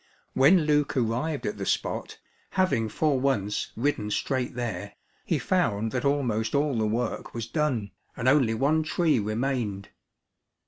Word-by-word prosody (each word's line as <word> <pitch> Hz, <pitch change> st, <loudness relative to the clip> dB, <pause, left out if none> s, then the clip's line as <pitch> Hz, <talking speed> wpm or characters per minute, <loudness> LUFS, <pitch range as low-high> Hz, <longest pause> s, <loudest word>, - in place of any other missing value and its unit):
When 165 Hz, +7 st, +6 dB
Luke 150 Hz, -2 st, +1 dB
arrived 125 Hz, +6 st, -1 dB
at 105 Hz, -1 st, -3 dB
the 100 Hz, -, -3 dB
spot, -, -, -2 dB, 0.4 s
having 150 Hz, -13 st, +2 dB
for 145 Hz, +2 st, +1 dB
once 115 Hz, -7 st, 0 dB
ridden 115 Hz, -4 st, -1 dB
straight 125 Hz, +3 st, -1 dB
there, 115 Hz, -7 st, -4 dB, 0.3 s
he -, -, +1 dB
found 115 Hz, -, 0 dB
that 125 Hz, -, -2 dB
almost 125 Hz, -5 st, 0 dB
all 145 Hz, -1 st, +1 dB
the 110 Hz, -1 st, +1 dB
work 115 Hz, +2 st, -2 dB
was 115 Hz, -2 st, -3 dB
done, 125 Hz, -6 st, -1 dB, 0.3 s
and 125 Hz, -, -1 dB
only 130 Hz, -5 st, +4 dB
one 145 Hz, +6 st, +2 dB
tree 155 Hz, -3 st, +1 dB
remained. 110 Hz, -2 st, -2 dB
125 Hz, 145 wpm, -27 LUFS, 110-145 Hz, 0.4 s, When